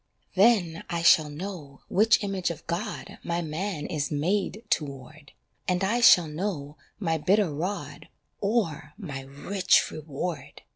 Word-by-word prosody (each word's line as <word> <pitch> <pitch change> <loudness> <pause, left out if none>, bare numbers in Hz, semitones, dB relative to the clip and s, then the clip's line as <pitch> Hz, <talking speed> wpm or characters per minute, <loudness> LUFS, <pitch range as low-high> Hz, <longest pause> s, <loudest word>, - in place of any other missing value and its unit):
Then 190 -5 +3
I 170 -1 -2
shall 155 -3 +6
know 150 -3 -7
which 215 +2 +4
image 195 -3 -1
of 170 -2 -7
God 185 +6 -4
My 170 0 -1
man 160 +1 -3
is 145 -3 -2
made 185 +8 -1
toward, 145 0 -3 0.4
And 180 0 +1
I 230 +5 +1
shall 175 -7 +7
know 150 -3 -4 0.2
my 165 -5 0
bitter 190 0 +2
rod 180 +7 -4 0.3
Or 195 -9 -1
my 150 -11 -6
rich 145 +8 +1
reward. 155 +3 -6
170 Hz, 135 wpm, -27 LUFS, 150-200 Hz, 0.4 s, shall